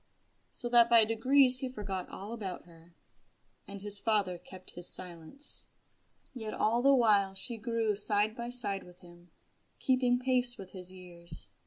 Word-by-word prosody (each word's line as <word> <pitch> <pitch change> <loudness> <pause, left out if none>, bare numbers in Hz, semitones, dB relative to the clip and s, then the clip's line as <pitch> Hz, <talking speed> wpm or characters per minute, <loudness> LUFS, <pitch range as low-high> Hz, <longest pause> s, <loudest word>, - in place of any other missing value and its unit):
So 240 - -1
that 235 -1 +4
by 230 -2 +5
degrees 255 +3 +2
he 260 -1 -5
forgot 195 -6 -7
all 205 +4 -9
about 195 -6 -8
her. 170 0 -21 0.7
And 200 0 -11
his 205 -1 -6
father 200 -6 -2
kept 185 +1 -12
silence. 180 - -5 0.7
Yet 220 -4 -7
all 230 +3 0
the 275 +1 +3
while 205 -5 +1
she 230 +4 -6
grew 225 -1 -3
side 210 +1 +1
by 235 0 -7
side 205 -6 +6
with 180 0 -19
him, 175 0 -18 0.5
keeping 255 -2 0
pace 250 -1 +4
with 190 -3 -12
his 185 -1 -11
years. 175 -2 +2
210 Hz, 155 wpm, -29 LUFS, 185-240 Hz, 0.7 s, side